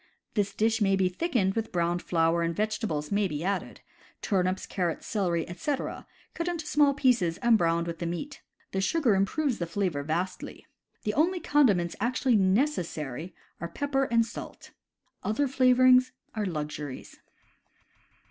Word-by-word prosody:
This 205 -2 -1
dish 225 +1 +1
may 195 -1 +3
be 190 -1 +2
thickened 195 - 0
with 225 +1 -3
browned 175 0 0
flour, 165 0 +1
and 170 0 -1
vegetables 210 -8 -2
may 200 0 +2
be 150 -2 -4
added 195 +1 -3 0.2
— - - -29
turnips, 185 -1 0
carrots, 175 -4 -2
celery, 175 -6 -1
etc., 280 - -4 0.3
cut 335 0 -3
into 340 -3 -3
small 290 -2 +3
pieces 230 -12 +2
and 235 -1 +4
browned 170 -3 +2
with 170 -1 -5
the 170 - -2
meat. 275 +12 -5 0.3
The 190 - -1
sugar 270 +1 +2
improves 230 +8 0
the 170 - -2
flavor 170 -4 -1
vastly. 170 +5 -4 0.4
The 210 - -1
only 345 - +2
condiments 210 - +2
actually 250 0 +1
necessary 185 - 0 0.2
are 170 - -4
pepper 275 +5 0
and 230 -2 +2
salt. 235 - -9 0.5
Other 255 +7 0
flavorings 255 0 +5 0.2
are 215 -2 -2
luxuries. 150 -4 -6
200 Hz, 150 wpm, -28 LUFS, 170-255 Hz, 0.5 s, flavorings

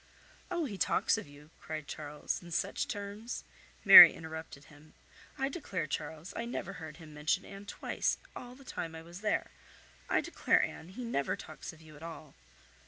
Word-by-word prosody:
"Oh! 345 -3 -1
he 205 -8 -6
talks - - +3
of - - -9
you," 145 +2 -16
cried 155 -1 -6
Charles, 150 -1 -4
"in 175 - -11
such 185 +4 -1
terms—" 205 +4 -5 0.4
Mary - - +13
interrupted 160 -3 -8
him. 150 +2 -18 0.4
"I 270 -1 0
declare, 270 - -3
Charles, 155 +3 -5
I 230 - -3
never 195 -5 -4
heard 160 -3 -9
him 160 -3 -12
mention 155 +6 0
Anne 200 +1 -10
twice - - -1 0.2
all 245 0 -9
the 275 +1 -16
time 165 -8 -5
I 160 - -8
was 170 +3 -11
there. 215 - 0 0.6
I - - +3
declare, - - +2
Anne, 160 - -5
he 245 +7 -7
never 140 -12 -1
talks 155 - -9
of 160 0 -17
you 155 -1 -14
at 145 - -14
all." 160 -3 -9
165 Hz, 180 wpm, -32 LUFS, 155-200 Hz, 0.6 s, Mary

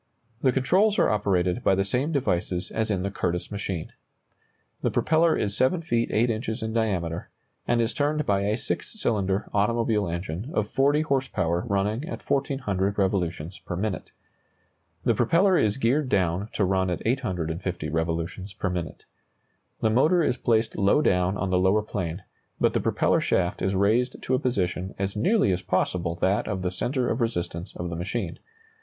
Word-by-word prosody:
The 130 - +4
controls 185 +12 +3
are - - +4
operated 95 -1 +1
by 95 - +4
the 95 - +1
same 125 +10 0
devices 90 - -1
as 110 0 -1
in 95 -3 0
the 100 - -2
Curtiss 90 -1 -2
machine. 100 -5 -4 0.9
The - - +1
propeller 160 +1 +3
is 100 -1 -1
7 165 +7 +2
feet 120 -7 0
8 115 +2 +2
inches 110 +1 -3
in 110 0 -3
diameter, 90 -7 -1 0.4
and 120 0 +2
is 115 0 +1
turned 150 +2 0
by 100 -1 +2
a 105 +2 0
six 220 - -4
cylinder 100 - 0
automobile 105 0 +1
engine 85 - -4
of 105 - +1
40 140 +6 +2
horse 135 -4 0
power 85 -1 -1
running 105 +4 0
at - - -7
1,400 115 -9 0
revolutions 90 -3 -1
per 90 - -6
minute. 100 +1 -3 0.9
The - - +3
propeller 185 +3 +3
is 110 -8 +2
geared 135 +3 +1
down 95 0 +1
to 100 - +1
run 95 0 +1
at 90 - -3
850 90 - -2
revolutions 85 +4 -2
per 95 -1 -2
minute. 85 -2 -5 0.8
The 110 - +2
motor 160 +9 +4
is 125 - +1
placed 110 -3 +1
low 100 +10 +4
down 90 -2 +2
on 95 0 -2
the 90 - +3
lower 95 +3 +3
plane, 90 -3 -4 0.4
but - - +3
the - - +1
propeller - - +2
shaft 90 -1 0
is 95 +1 0
raised 110 +6 +2
to 130 - -1
a 130 - +3
position 95 -7 -1
as 100 +1 -2
nearly 185 - +3
as 90 0 0
possible 90 -2 0
that 95 +4 +1
of 95 -4 -3
the 90 - 0
centre 125 +6 -1
of 115 - -1
resistance 90 -5 -2
of 85 0 -4
the - - -3
machine. 90 +1 -3
100 Hz, 175 wpm, -26 LUFS, 90-120 Hz, 0.9 s, The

